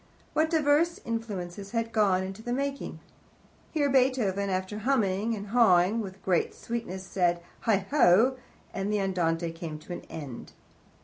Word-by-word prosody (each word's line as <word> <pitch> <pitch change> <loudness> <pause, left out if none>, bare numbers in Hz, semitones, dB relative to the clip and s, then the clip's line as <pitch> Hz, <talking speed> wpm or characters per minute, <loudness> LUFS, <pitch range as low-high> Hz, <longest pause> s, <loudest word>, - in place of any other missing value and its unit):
What 315 +1 +2
diverse 315 +2 +2
influences 200 -4 -4
had 230 -1 -1
gone 190 -3 +2
to 205 - -12
the 240 - -5
making! 280 +1 -3 0.7
Here 295 -3 +1
Beethoven, 250 -8 +2
after 190 +2 -2
humming 220 -3 +1
and 200 -1 -7
hawing 205 -3 +4
with 195 -2 -8
great 180 -3 +1
sweetness, 225 -6 -5
said 175 -2 +1 0.3
"Heigho," 225 +2 +4 0.4
and 195 +2 -2
the 210 - +1
Andante 170 -3 0
came 165 -2 -6
to 155 +3 -8
an - - -6
end. 140 -7 -8
200 Hz, 140 wpm, -28 LUFS, 185-240 Hz, 0.7 s, hawing